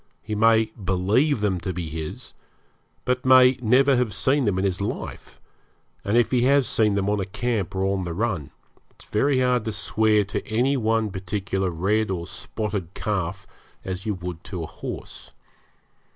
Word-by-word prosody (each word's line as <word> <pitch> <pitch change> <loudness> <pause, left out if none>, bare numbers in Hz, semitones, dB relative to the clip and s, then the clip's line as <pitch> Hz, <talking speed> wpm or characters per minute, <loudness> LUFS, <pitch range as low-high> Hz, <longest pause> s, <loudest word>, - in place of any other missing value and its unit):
He 110 - -5
may 110 +1 +3
believe 100 +9 +2
them 100 -4 +1
to 95 +1 -4
be 85 -1 -4
his, 80 0 -6 0.7
but 125 0 0
may 130 0 +6
never 130 +4 +4
have 120 -5 0
seen 135 +4 +2
them 100 -4 +1
in 95 - 0
his 95 0 -1
life; 100 - -5 0.6
and 105 +3 +1
if 120 - +3
he 125 -2 +3
has 140 -2 +4
seen 105 -3 +2
them 100 -1 0
on 105 0 +1
a 95 - -1
camp 110 -2 -2
or 95 - 0
on 95 0 0
the 85 -2 -4
run, 95 - -2 0.4
it's - - -18
very 130 +4 +1
hard 125 -2 +2
to 110 - -1
swear 110 0 +2
to 100 - -4
any 125 +6 +1
one 110 -3 +1
particular 95 0 -2
red 100 +6 0
or 90 -3 -3
spotted 100 -1 -5
calf 95 -2 -2 0.4
as 95 0 -4
you 105 - 0
would 90 -2 -7
to 90 -6 -5
a - - -3
horse. - - -8
105 Hz, 180 wpm, -24 LUFS, 95-120 Hz, 0.7 s, may